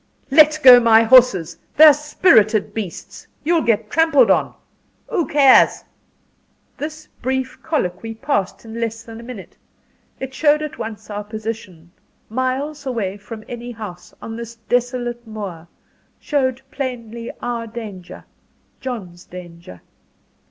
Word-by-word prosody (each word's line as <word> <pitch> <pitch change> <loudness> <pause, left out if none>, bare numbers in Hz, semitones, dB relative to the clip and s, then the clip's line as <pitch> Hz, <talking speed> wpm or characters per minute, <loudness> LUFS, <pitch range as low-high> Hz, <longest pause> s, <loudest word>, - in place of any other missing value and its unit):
"Let 305 +1 +6
go 250 -2 +10
my 230 -1 +5
horses! 220 -9 +4 0.2
They're 310 0 +9
spirited 275 - +2
beasts. 205 -6 -7 0.2
You'll 330 +2 +2
get 230 -6 0
trampled 290 -9 +4
on." - - +1 0.5
"Who 380 -10 -1
cares?" 280 -3 +5 0.9
This 310 +1 -7 0.2
brief 260 +1 -3
colloquy 225 - -3
passed 225 -4 -2
in 225 +1 -7
less 225 0 -3
than 225 -1 -11
a - - -10
minute. 235 -5 -10 0.6
It 265 0 -6
showed 300 +2 +2
at 305 - -7
once 220 -1 -7
our 205 0 -4
position 210 -6 -7 0.4
miles 270 +5 -3
away 215 -7 -2
from 215 +2 -10
any 240 0 -7
house 210 -6 -9
on 225 - -6
this 235 0 -8
desolate 240 +1 -2
moor; 195 -7 -7 0.5
showed 265 -3 -1
plainly 235 -4 -5
our 235 -1 -4
danger 215 -6 -9 0.5
John's 195 -10 -7
danger. 170 - -12
235 Hz, 125 wpm, -20 LUFS, 215-265 Hz, 0.9 s, go